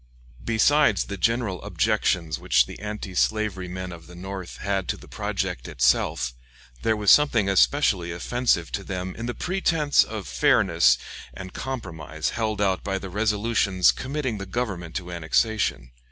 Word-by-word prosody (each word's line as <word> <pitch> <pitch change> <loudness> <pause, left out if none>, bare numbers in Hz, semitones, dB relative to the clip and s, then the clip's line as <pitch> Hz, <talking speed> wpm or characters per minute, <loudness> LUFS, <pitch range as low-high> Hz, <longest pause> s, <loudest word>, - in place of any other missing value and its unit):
Besides 115 0 +3
the 100 - -6
general 115 -2 0
objections 100 -6 0
which 65 -1 +3
the - - -10
anti 105 -2 -6
slavery 100 -1 0
men 90 0 -6
of 85 -2 -11
the 90 - -12
North 95 0 -7
had 100 -2 -2
to - - -2
the - - -14
project - - -3
itself, - - +1 0.5
there 110 - +2
was 105 -1 +4
something 120 -9 +5
especially 95 -3 +3
offensive 90 -1 0
to - - -3
them 95 -1 -5
in 115 +1 -5
the 120 - -3
pretense 165 -6 +2
of - - -6
fairness 65 +1 +4 0.4
and 95 0 -8
compromise 80 - -4
held 110 -2 -2
out 95 -3 +1
by 95 -1 -1
the 95 -1 -7
resolutions 105 -2 +2
committing 130 -5 -3
the 100 - -6
Government 95 -6 -4
to 90 -1 -4
annexation. 85 - 0
100 Hz, 155 wpm, -25 LUFS, 90-115 Hz, 0.5 s, something